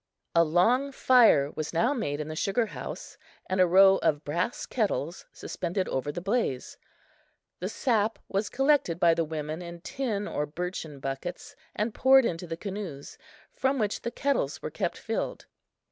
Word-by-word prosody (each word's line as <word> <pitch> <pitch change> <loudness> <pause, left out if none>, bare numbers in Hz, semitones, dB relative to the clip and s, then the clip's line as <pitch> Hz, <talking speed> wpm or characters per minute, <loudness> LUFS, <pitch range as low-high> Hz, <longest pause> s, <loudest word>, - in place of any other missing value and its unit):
A 170 - +6
long 225 - +2
fire 230 - +5
was 155 +1 -5
now 235 - +2
made 150 - -2
in 150 - -4
the 155 - -5
sugar 200 +8 +1
house, - - -8 0.3
and 185 0 +1
a 180 - +6
row 190 +2 +7
of 145 0 0
brass 175 +10 -2
kettles 195 - -2
suspended 185 +2 -3
over 135 +2 -2
the 160 - -5
blaze. 195 - -1 0.8
The 185 - -3
sap 225 -2 +1
was 200 +2 -1
collected 270 - +2
by 170 -2 +5
the 165 0 +1
women 155 +1 -4
in 170 -1 -8
tin 210 -3 -3
or 150 - -2
birchen 160 -2 -5
buckets 135 +6 -5 0.2
and 215 +1 -1
poured 265 -1 +6
into 175 -2 -3
the 165 0 -4
canoes, 190 -8 -7 0.3
from 265 +1 0
which 215 -4 -1
the - - -2
kettles 275 +3 -1
were - - -5
kept - - -2
filled. - - -3
185 Hz, 165 wpm, -28 LUFS, 160-230 Hz, 0.8 s, row